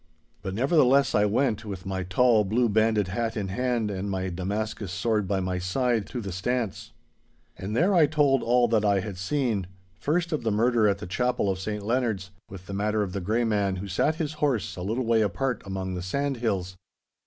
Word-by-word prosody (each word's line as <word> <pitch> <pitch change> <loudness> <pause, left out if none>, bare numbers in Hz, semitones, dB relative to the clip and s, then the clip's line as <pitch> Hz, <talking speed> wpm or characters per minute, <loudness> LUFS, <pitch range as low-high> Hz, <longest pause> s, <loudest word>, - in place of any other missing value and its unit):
But, 95 -1 -4
nevertheless, 135 - +4
I 105 - +4
went, 110 +1 +1
with 100 -4 -7
my 95 -1 -2
tall, 110 +5 +3
blue 115 +5 +1
banded 110 -2 +2
hat 115 +4 -2
in 100 -3 -2
hand 120 0 -1
and 100 +1 -3
my 95 -1 -2
Damascus 100 +2 -3
sword 105 +1 0
by 95 0 0
my 90 -1 -2
side, 115 +4 0
to 125 - -5
the 100 -3 -5
stance. 110 +3 -3 0.6
And 100 +3 -5
there 180 +9 +3
I 165 -5 +5
told 145 -3 +3
all 120 +1 +3
that 110 -2 +2
I 100 -2 +3
had 100 -2 -6
seen—first 105 - -2
of 155 - -1
the 115 - 0
murder 115 +1 +3
at 100 - +2
the - - -7
Chapel 120 +2 0
of 95 - -4
St 105 +1 -4
Leonards, 110 -6 -1 0.2
with 95 -1 -10
the 100 - -7
matter 105 +1 0
of 95 -3 -5
the 100 - -3
Grey 110 +6 0
Man 100 -4 +1
who 95 +2 -5
sat 120 - +1
his 155 -2 -3
horse 130 -9 0
a 90 - -7
little 115 +7 -1
way 115 -1 +3
apart 110 +6 -1
among 95 -1 -3
the 90 - -4
sandhills. 110 -4 -2
105 Hz, 200 wpm, -26 LUFS, 95-125 Hz, 0.6 s, I